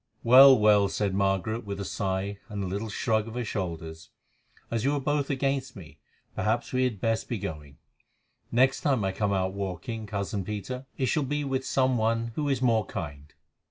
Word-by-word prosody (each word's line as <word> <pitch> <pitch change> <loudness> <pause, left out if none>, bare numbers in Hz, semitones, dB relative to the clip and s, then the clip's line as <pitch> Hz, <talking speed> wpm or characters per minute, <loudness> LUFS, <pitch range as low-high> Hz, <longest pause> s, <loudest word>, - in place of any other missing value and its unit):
"Well, 130 +3 +9
well," 105 -2 +5
said 100 -1 -1
Margaret 100 +4 0
with 100 -1 -5
a 100 - -4
sigh 95 +1 -2
and 100 -1 -4
a - - -2
little 100 +4 -3
shrug 110 0 0
of 115 - -8
her 125 -1 -2
shoulders, 80 -5 -5 0.6
"as 115 -2 -1
you 140 +2 +2
are - - 0
both 145 0 -1
against 135 -1 -1
me, 80 -8 -12 0.3
perhaps 110 +5 -1
we 130 0 +2
had 115 -6 -2
best 115 +1 -1
be 120 - -1
going. 75 -6 -7 0.7
Next 130 +3 +3
time 130 -8 +1
I 95 - 0
come 100 +1 -1
out 95 -1 0
walking, 100 +3 -5
cousin 100 -1 -3
Peter, 105 +7 -5
it 130 - 0
shall 150 +5 +1
be 145 +2 -1
with 135 -1 -1
some 130 -2 +1
one 115 +1 0
who 145 +3 -1
is 130 -2 0
more 110 -5 +2
kind." 75 -2 -7
110 Hz, 195 wpm, -27 LUFS, 95-130 Hz, 0.7 s, Well